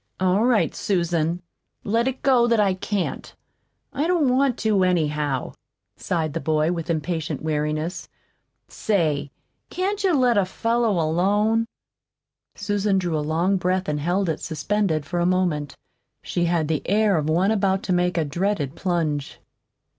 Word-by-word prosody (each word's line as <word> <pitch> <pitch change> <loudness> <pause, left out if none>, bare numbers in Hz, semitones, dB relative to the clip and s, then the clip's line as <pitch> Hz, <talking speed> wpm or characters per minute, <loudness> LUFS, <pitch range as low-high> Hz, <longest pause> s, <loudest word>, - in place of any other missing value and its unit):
"All 185 +3 +2
right, 245 -4 +2
Susan, 170 -2 -1 0.4
let 230 +4 +1
it 265 0 -3
go 250 -3 +4
that 230 -2 +2
I 200 -2 +3
can't. 190 0 -3 0.6
I 295 +4 0
don't 310 -8 +2
want 270 -2 +2
to, 210 -4 +2
anyhow," 150 -6 0 0.4
sighed 160 -4 -2
the 165 - -2
boy 155 0 +1
with 170 -1 -4
impatient 160 -2 -2
weariness. 155 +2 -2 0.6
"Say, 155 -9 0 0.4
can't 395 +3 -2
you 370 -4 +3
let 245 -5 +3
a 195 - +2
fellow 230 0 0
alone?" 205 +8 +1 0.9
Susan 205 -1 0
drew 175 -3 -1
a 155 - 0
long 165 +6 +1
breath 185 +1 -1
and 150 -1 -1
held 180 +5 0
it 160 -2 -1
suspended 160 0 -1
for 175 - -3
a 175 - +1
moment. 175 -6 0 0.5
She 175 - -1
had 170 -2 +1
the 155 -2 -1
air 210 0 +3
of 155 0 -1
one 180 +6 +2
about 195 -2 +1
to 185 - 0
make 180 -1 +1
a 160 - +1
dreaded 160 -2 -1
plunge. 160 -6 -2
180 Hz, 155 wpm, -23 LUFS, 160-210 Hz, 0.9 s, go